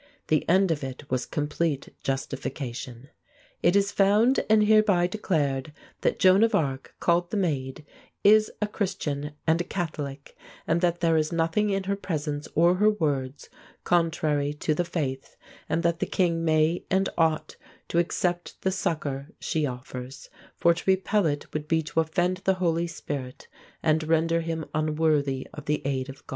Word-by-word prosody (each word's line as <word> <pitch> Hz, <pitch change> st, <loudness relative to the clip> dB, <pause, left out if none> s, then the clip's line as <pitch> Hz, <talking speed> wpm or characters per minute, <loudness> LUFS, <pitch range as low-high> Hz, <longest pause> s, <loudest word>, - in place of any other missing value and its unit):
The 155 Hz, -, +1 dB
end 190 Hz, 0 st, +4 dB
of 145 Hz, -3 st, -2 dB
it 135 Hz, 0 st, -7 dB
was 130 Hz, -1 st, -1 dB
complete 150 Hz, -1 st, -2 dB
justification: 135 Hz, -2 st, -4 dB, 0.5 s
"It 175 Hz, -, +3 dB
is 200 Hz, 0 st, +3 dB
found 210 Hz, +6 st, +3 dB
and 215 Hz, 0 st, +5 dB
hereby 210 Hz, -4 st, +4 dB
declared 150 Hz, -8 st, -1 dB, 0.3 s
that -, -, 0 dB
Joan 185 Hz, +2 st, +5 dB
of 230 Hz, -, +3 dB
Arc, 135 Hz, -3 st, -2 dB
called 175 Hz, 0 st, +2 dB
the 210 Hz, -, -2 dB
Maid, 145 Hz, -6 st, -2 dB, 0.4 s
is 215 Hz, +1 st, +6 dB
a -, -, +3 dB
Christian 150 Hz, -8 st, -3 dB
and 165 Hz, +1 st, +3 dB
a -, -, -1 dB
Catholic, 150 Hz, -6 st, -5 dB, 0.3 s
and 165 Hz, +1 st, +1 dB
that 175 Hz, -1 st, +1 dB
there 165 Hz, -1 st, +3 dB
is 155 Hz, +1 st, 0 dB
nothing 165 Hz, +5 st, +1 dB
in 195 Hz, -1 st, 0 dB
her 200 Hz, +1 st, -1 dB
presence 150 Hz, -6 st, -3 dB
or 170 Hz, +3 st, +5 dB
her 210 Hz, +2 st, +5 dB
words 145 Hz, -8 st, -2 dB, 0.4 s
contrary 155 Hz, -4 st, +1 dB
to 155 Hz, +1 st, 0 dB
the 175 Hz, -, 0 dB
faith, 135 Hz, -6 st, -4 dB, 0.3 s
and 160 Hz, +2 st, 0 dB
that 170 Hz, 0 st, +1 dB
the -, -, -1 dB
king 170 Hz, -3 st, +1 dB
may 155 Hz, +1 st, +2 dB
and 190 Hz, 0 st, +2 dB
ought 160 Hz, -1 st, +1 dB, 0.3 s
to 170 Hz, -, +2 dB
accept 175 Hz, 0 st, -1 dB
the 190 Hz, -, +2 dB
succor 150 Hz, -7 st, -2 dB
she 155 Hz, -2 st, -1 dB
offers; 125 Hz, +1 st, -8 dB, 0.3 s
for 170 Hz, -, +4 dB
to 175 Hz, -, -7 dB
repel 190 Hz, 0 st, +2 dB
it 145 Hz, -1 st, -2 dB
would 150 Hz, 0 st, -3 dB
be 160 Hz, 0 st, +1 dB
to 155 Hz, +2 st, -1 dB
offend 175 Hz, +3 st, +1 dB
the 190 Hz, 0 st, +1 dB
Holy 170 Hz, -2 st, 0 dB
Spirit, 140 Hz, -5 st, -6 dB, 0.4 s
and 160 Hz, 0 st, +3 dB
render 165 Hz, +1 st, +2 dB
him 165 Hz, -1 st, -3 dB
unworthy 150 Hz, -3 st, +1 dB
of 150 Hz, -, -9 dB
the 150 Hz, 0 st, 0 dB
aid 135 Hz, -1 st, -1 dB
of 135 Hz, -, -11 dB
God." -, -, -26 dB
160 Hz, 170 wpm, -26 LUFS, 145-180 Hz, 0.5 s, is